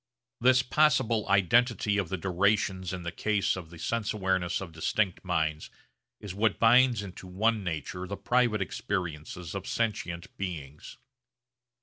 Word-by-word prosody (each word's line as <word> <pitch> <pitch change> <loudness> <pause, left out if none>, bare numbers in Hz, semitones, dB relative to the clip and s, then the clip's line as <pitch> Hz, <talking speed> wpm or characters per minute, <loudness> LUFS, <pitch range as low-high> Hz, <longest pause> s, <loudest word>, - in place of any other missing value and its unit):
This 130 +1 +5
possible 125 -6 +2
identity 105 +2 +3
of 95 -5 -2
the 95 - -2
durations 95 0 0
in 90 -2 -5
the 85 - -4
case 105 +3 0
of 90 -4 -8
the 85 - -12
sense 110 +6 -2
awareness 95 -4 0
of 95 -3 -7
distinct 90 +4 -1
minds 80 -4 -1 0.5
is 100 -3 -7
what 105 +1 +1
binds 120 -1 +5
into 95 -1 -9
one 105 +3 0
nature 90 +2 -4
the 100 - -5
private 110 0 +2
experiences 85 -3 -4
of 100 -2 -5
sentient 90 -7 -3
beings. 75 -7 -6
95 Hz, 140 wpm, -29 LUFS, 90-110 Hz, 0.5 s, This